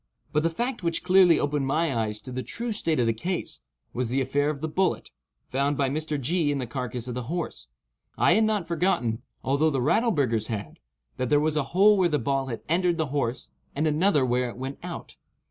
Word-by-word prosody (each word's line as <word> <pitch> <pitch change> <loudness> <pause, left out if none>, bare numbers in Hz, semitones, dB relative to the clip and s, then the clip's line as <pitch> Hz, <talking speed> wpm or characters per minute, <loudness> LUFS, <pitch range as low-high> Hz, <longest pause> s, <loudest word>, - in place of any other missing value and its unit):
But 150 - +3
the 165 - +2
fact 240 +9 -3
which 170 -2 -1
clearly 180 -3 +6
opened 145 -1 0
my 155 0 +1
eyes 110 -2 -2
to 130 - -9
the 130 +1 -3
true 230 - -4
state 165 -8 0
of 120 - +3
the 115 - +2
case, 175 +11 -4 0.3
was 125 -1 -2
the 130 +3 +1
affair 140 +2 +1
of 150 -2 -3
the 160 - -2
bullet, 185 +3 -1 0.4
found 140 +2 0
by 135 -2 +1
Mr. 155 0 -2
G. 155 +3 +1
in 145 - -1
the 130 - -2
carcass 125 -1 -5
of 125 - -4
the 125 - -3
horse. 170 - -4 0.5
I - - +5
had 220 +1 +4
not 210 -6 0
forgotten, 155 -10 0 0.2
although 140 +4 +2
the 140 -3 -1
Rattleburghers 140 - +1
had, 105 -3 -5 0.4
that 130 -1 -1
there 145 - +4
was 155 +1 0
a 150 - +2 0.2
hole 205 +2 +7
where 180 -2 +4
the 150 - +1
ball 135 -2 -1
had 115 -4 -5
entered 175 +1 +2
the 160 -4 -1
horse, 130 -3 -2 0.3
and 150 +3 0
another 155 -2 +3
where 125 0 +1
it 120 - -10
went 135 +2 -5
out. - - -8
145 Hz, 220 wpm, -26 LUFS, 130-170 Hz, 0.5 s, hole